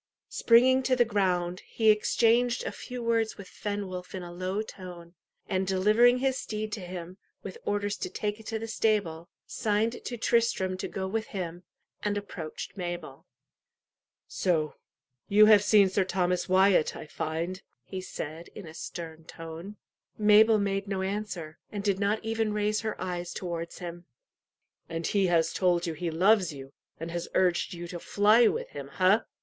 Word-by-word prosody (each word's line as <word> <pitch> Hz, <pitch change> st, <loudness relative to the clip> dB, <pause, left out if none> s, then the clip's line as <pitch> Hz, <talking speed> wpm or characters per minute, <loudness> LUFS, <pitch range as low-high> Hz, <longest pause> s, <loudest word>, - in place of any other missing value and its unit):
Springing 255 Hz, +3 st, +5 dB
to 260 Hz, 0 st, +2 dB
the 240 Hz, -1 st, +4 dB
ground, 185 Hz, -4 st, 0 dB
he 220 Hz, -2 st, +3 dB
exchanged 235 Hz, +3 st, +2 dB
a -, -, -2 dB
few 250 Hz, -1 st, -7 dB
words 230 Hz, -1 st, +1 dB
with 200 Hz, -2 st, -10 dB
Fenwolf 190 Hz, -3 st, -5 dB
in 185 Hz, -, -5 dB
a 175 Hz, -, -8 dB
low 185 Hz, +4 st, -2 dB
tone, 175 Hz, -4 st, -10 dB, 0.3 s
and 190 Hz, 0 st, -1 dB
delivering 215 Hz, +6 st, +4 dB
his 265 Hz, 0 st, 0 dB
steed 215 Hz, 0 st, -4 dB
to 215 Hz, -, -3 dB
him, 180 Hz, 0 st, -8 dB, 0.2 s
with 465 Hz, -, -8 dB
orders 205 Hz, 0 st, -1 dB
to -, -, -4 dB
take 210 Hz, 0 st, -3 dB
it 220 Hz, -, -13 dB
to 225 Hz, -, -2 dB
the 225 Hz, +1 st, -5 dB
stable, 200 Hz, -7 st, 0 dB, 0.2 s
signed 220 Hz, +1 st, -1 dB
to 240 Hz, -, -5 dB
Tristram 230 Hz, -5 st, +1 dB
to -, -, -4 dB
go 190 Hz, -1 st, -4 dB
with 220 Hz, +3 st, -2 dB
him, 175 Hz, -3 st, -5 dB, 0.4 s
and 205 Hz, 0 st, -1 dB
approached 175 Hz, -6 st, -6 dB
Mabel. 175 Hz, -7 st, -6 dB, 1.0 s
"So 155 Hz, -5 st, 0 dB, 0.6 s
you 210 Hz, +1 st, +7 dB
have 210 Hz, -2 st, +7 dB
seen 205 Hz, -2 st, +6 dB
Sir 190 Hz, +1 st, +1 dB
Thomas 180 Hz, -1 st, 0 dB
Wyat, 190 Hz, -3 st, +4 dB
I -, -, -7 dB
find," 165 Hz, +4 st, -4 dB, 0.2 s
he 190 Hz, -1 st, -6 dB
said, 165 Hz, -2 st, -7 dB
in 205 Hz, -, -8 dB
a 160 Hz, -, -10 dB
stern 160 Hz, -1 st, -7 dB
tone. 165 Hz, +6 st, -8 dB, 0.4 s
Mabel 215 Hz, +1 st, +6 dB
made 200 Hz, 0 st, -1 dB
no 195 Hz, -1 st, -2 dB
answer, 190 Hz, -5 st, -4 dB
and 205 Hz, -2 st, -4 dB
did 200 Hz, -2 st, +1 dB
not 205 Hz, +2 st, 0 dB
even 225 Hz, -1 st, 0 dB
raise 210 Hz, 0 st, 0 dB
her 220 Hz, -1 st, -4 dB
eyes 175 Hz, -1 st, -4 dB
towards 170 Hz, -2 st, -5 dB
him. 175 Hz, -1 st, -7 dB, 0.8 s
"And 165 Hz, 0 st, -4 dB
he 200 Hz, -2 st, +2 dB
has 165 Hz, -2 st, +2 dB
told 175 Hz, -2 st, +2 dB
you 165 Hz, -, -2 dB
he 170 Hz, +2 st, -3 dB
loves 185 Hz, +2 st, +3 dB
you, 135 Hz, -1 st, -10 dB, 0.3 s
and 165 Hz, +1 st, -5 dB
has 175 Hz, 0 st, -3 dB
urged 180 Hz, -1 st, +2 dB
you 175 Hz, 0 st, -6 dB
to 175 Hz, -, -6 dB
fly 215 Hz, +6 st, +4 dB
with -, -, -2 dB
him 140 Hz, -1 st, -7 dB
ha?" 190 Hz, +8 st, +3 dB
190 Hz, 170 wpm, -28 LUFS, 175-215 Hz, 1.0 s, you